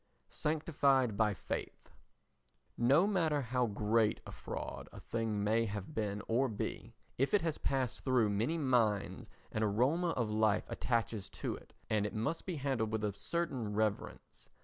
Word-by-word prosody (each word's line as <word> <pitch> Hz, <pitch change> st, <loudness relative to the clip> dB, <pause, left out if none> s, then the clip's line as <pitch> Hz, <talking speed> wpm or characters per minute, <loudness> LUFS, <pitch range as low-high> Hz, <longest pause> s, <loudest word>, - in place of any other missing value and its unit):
Sanctified 140 Hz, -6 st, +2 dB
by 105 Hz, -1 st, +2 dB
Faith 75 Hz, -, -5 dB, 0.8 s
No 135 Hz, +9 st, +5 dB
matter 165 Hz, -8 st, +2 dB
how 125 Hz, 0 st, +1 dB
great 105 Hz, +1 st, +2 dB
a -, -, -8 dB
fraud -, -, -6 dB
a -, -, -10 dB
thing 110 Hz, -3 st, -2 dB
may 110 Hz, +2 st, +2 dB
have 105 Hz, +5 st, -5 dB
been 105 Hz, -3 st, -2 dB
or 125 Hz, +4 st, +2 dB
be, 105 Hz, -, -5 dB, 0.2 s
if 135 Hz, +9 st, +3 dB
it 200 Hz, -, +2 dB
has 160 Hz, -3 st, -1 dB
passed 130 Hz, -4 st, -1 dB
through 125 Hz, -6 st, +3 dB
many 115 Hz, +11 st, 0 dB
minds 120 Hz, -8 st, +1 dB, 0.2 s
an 110 Hz, -, -2 dB
aroma 125 Hz, -, +2 dB
of 120 Hz, -8 st, -1 dB
life 110 Hz, -1 st, +2 dB
attaches 115 Hz, -5 st, -1 dB
to -, -, -3 dB
it -, -, -15 dB
and 105 Hz, -2 st, +1 dB
it -, -, -7 dB
must 115 Hz, -, -2 dB
be 180 Hz, -, -2 dB
handled 130 Hz, -6 st, -1 dB
with 110 Hz, -1 st, -1 dB
a 105 Hz, -1 st, 0 dB
certain 125 Hz, -, -2 dB
reverence. 110 Hz, -1 st, -2 dB
115 Hz, 160 wpm, -34 LUFS, 105-140 Hz, 0.8 s, No